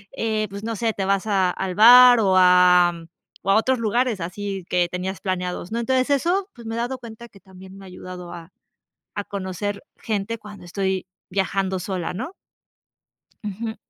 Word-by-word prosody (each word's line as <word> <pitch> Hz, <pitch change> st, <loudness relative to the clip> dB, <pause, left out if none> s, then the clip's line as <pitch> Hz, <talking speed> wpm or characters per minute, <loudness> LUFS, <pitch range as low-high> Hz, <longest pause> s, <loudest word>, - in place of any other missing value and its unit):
eh, 215 Hz, -1 st, -1 dB
pues 200 Hz, +1 st, -8 dB
no 230 Hz, 0 st, -3 dB
sé, 225 Hz, 0 st, -1 dB
te 195 Hz, -, -3 dB
vas 195 Hz, 0 st, 0 dB
a, 195 Hz, -4 st, +2 dB
al 185 Hz, +1 st, -3 dB
bar 245 Hz, +3 st, +8 dB
o 190 Hz, -3 st, +2 dB
a 180 Hz, -1 st, +6 dB, 0.5 s
o 195 Hz, -, -4 dB
a -, -, +5 dB
otros 255 Hz, +3 st, +2 dB
lugares 230 Hz, -2 st, 0 dB
así 195 Hz, +2 st, -5 dB
que 175 Hz, -1 st, +2 dB
tenías 185 Hz, +1 st, -5 dB
planeados, 180 Hz, 0 st, -3 dB
¿no? 230 Hz, -, -2 dB
Entonces, 255 Hz, +2 st, 0 dB
eso, 360 Hz, +8 st, +1 dB
pues 235 Hz, -2 st, -12 dB
me 225 Hz, -, -4 dB
he -, -, -4 dB
dado 245 Hz, +2 st, -3 dB
cuenta 235 Hz, 0 st, -11 dB
que 195 Hz, -, -18 dB
también 190 Hz, 0 st, -14 dB
me 195 Hz, -, -12 dB
ha -, -, -11 dB
ayudado 180 Hz, -1 st, -9 dB
a 170 Hz, +1 st, -10 dB, 0.7 s
a 205 Hz, -, -3 dB
conocer 200 Hz, +1 st, -5 dB
gente 220 Hz, +1 st, -3 dB
cuando 210 Hz, -3 st, -12 dB
estoy 190 Hz, +1 st, -2 dB, 0.2 s
viajando 190 Hz, 0 st, -1 dB
sola, 185 Hz, -2 st, -4 dB
¿no? 320 Hz, -, -5 dB, 1.1 s
Ujú. 220 Hz, +2 st, -5 dB
195 Hz, 180 wpm, -22 LUFS, 185-225 Hz, 1.1 s, bar